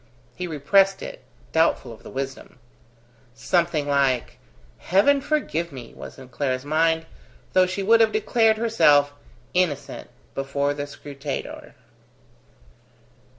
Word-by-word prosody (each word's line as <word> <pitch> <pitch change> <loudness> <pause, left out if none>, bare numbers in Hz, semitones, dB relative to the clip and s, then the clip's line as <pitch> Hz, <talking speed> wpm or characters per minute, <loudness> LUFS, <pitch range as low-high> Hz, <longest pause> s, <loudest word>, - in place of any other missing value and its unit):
He 180 - -4
repressed 195 +6 +2
it, - - -8 0.3
doubtful 160 -7 +1
of 110 - -15
the - - -11
wisdom. 135 -1 -6 0.8
Something 165 +4 0
like 135 -3 +1 0.4
"heaven 240 - +3
forgive 260 - -1
me" 130 -4 -10
was - - -10
in 130 -2 -12
Clara's 130 0 -2
mind, 160 +2 +1 0.5
though 185 0 +5
she 190 +2 -3
would 230 +3 +5
have 220 -1 +4
declared 220 0 +2
herself 145 -11 +4 0.4
innocent 180 -6 -1 0.2
before 140 +1 -1
the 145 0 -5
scrutator. 140 0 -7
155 Hz, 115 wpm, -24 LUFS, 140-195 Hz, 0.8 s, though